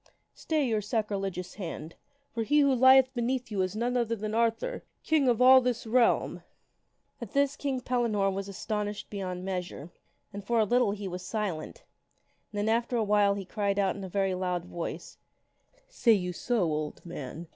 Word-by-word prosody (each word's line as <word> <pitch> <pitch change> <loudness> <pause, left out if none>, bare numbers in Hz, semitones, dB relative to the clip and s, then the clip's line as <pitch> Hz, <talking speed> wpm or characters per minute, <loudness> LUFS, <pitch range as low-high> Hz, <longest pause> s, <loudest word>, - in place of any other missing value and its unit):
Stay 310 -3 -1
your 220 -4 0
sac 210 +1 -1
rilegious 195 -2 -3
hand! 165 -4 -6 0.4
For 230 - -2
he 295 +7 +3
who 280 -1 +4
lieth 260 +1 +6
beneath 245 -1 -2
you 200 -2 0
is 185 +2 -2
none 240 +3 -1
other 230 -2 +1
than 215 0 -4
Arthur, 230 - 0 0.2
King 310 -4 +2
of 245 +1 +3
all 260 +1 +8
this 245 -2 -2
realm! 235 +1 +2 0.4
" - - -44
At 230 -4 -7
this 280 0 +2
King 275 -3 -2
Pellinore 230 -6 +1
was 195 +1 -4
astonished 210 +1 -4
beyond 185 -3 -4
measure. 180 -4 -5 0.4
And 200 0 -6
for 235 +4 0
a 220 - +4
little 245 +1 +3
he 200 -1 -4
was 180 0 -5
silent, 210 - -4 0.7
and 210 - -7
then 205 +1 0
after 235 +2 +1
awhile 205 -2 +3
he 200 -1 -5
cried 200 0 -1
out 195 -2 +1
in 200 - -7
a 190 - -6
very 195 0 0
loud 180 -1 -2
voice, 170 -2 -6 0.4
" - - -44 0.2
Say 245 - +3
you 180 -3 -1
so, 235 +3 0
old 155 -1 -3
man 165 0 -7
210 Hz, 190 wpm, -29 LUFS, 190-245 Hz, 0.7 s, all